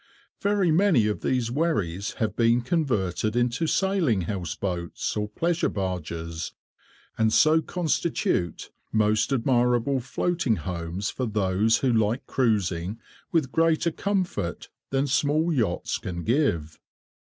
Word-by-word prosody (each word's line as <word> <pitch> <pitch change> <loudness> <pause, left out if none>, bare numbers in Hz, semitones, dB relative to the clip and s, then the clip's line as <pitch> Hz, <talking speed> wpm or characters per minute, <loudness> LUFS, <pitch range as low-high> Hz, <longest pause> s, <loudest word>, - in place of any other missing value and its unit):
Very 200 -4 +2
many 165 - +4
of 105 -1 -1
these 125 -3 0
wherries 105 - -1
have 110 - -2
been 115 +1 +3
converted 115 - 0
into 120 +6 +1
sailing 180 - +1
house 90 -2 -3
boats 90 -3 -3
or 105 -1 -2
pleasure 170 +9 0
barges, 85 -4 -4 0.7
and 110 0 +3
so 155 +6 +5
constitute 160 - -1 0.2
most 110 +3 +2
admirable 125 0 +2
floating 135 0 0
homes 85 +3 -4
for 130 - -3
those 105 +1 +2
who 125 - +3
like 110 +4 +1
cruising 100 -5 0 0.3
with 155 -6 +1
greater 165 +1 +2
comfort 185 - -2 0.2
than 135 +1 +1
small 150 +4 +1
yachts 110 - -1
can 85 -2 -5
give. 90 - 0
115 Hz, 120 wpm, -26 LUFS, 95-155 Hz, 0.7 s, so